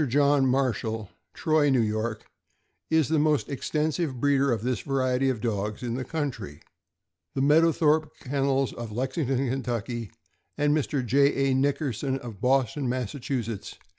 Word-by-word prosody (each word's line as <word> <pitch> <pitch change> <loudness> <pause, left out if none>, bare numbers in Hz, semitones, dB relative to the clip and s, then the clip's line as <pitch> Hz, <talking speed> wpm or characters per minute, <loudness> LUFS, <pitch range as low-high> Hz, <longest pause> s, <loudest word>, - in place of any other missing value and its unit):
John 140 +1 +3
Marshall, 115 -5 -1 0.2
Troy, 155 -2 +2
N. 135 - +3 0.2
Y., 110 +1 -1 0.8
is 160 -2 +3
the 160 0 +2
most 150 -1 +2
extensive 150 0 -1
breeder 140 0 +3
of 115 -3 -1
this 125 -1 0
variety 135 -1 0
of 120 -5 -2
dogs 105 -1 -2
in 120 -1 -2
the 130 +2 -2
country. 125 - -4 0.8
The 135 - 0
Mead 150 +4 +5
owthorpe 155 -1 +3
Kennels, 135 0 0
of 115 -2 -7
Lexington, 130 +1 -1
Ky., 120 -2 -3 0.5
and 145 0 +2
Mr. 140 -3 -1
J. 135 +1 +3
A. - - +3
Nick 135 +2 +2
erson, 135 -1 -1
of 115 -7 -9
Boston, 130 +1 +1
Mass. 125 -2 -2
135 Hz, 145 wpm, -26 LUFS, 120-145 Hz, 0.8 s, Mead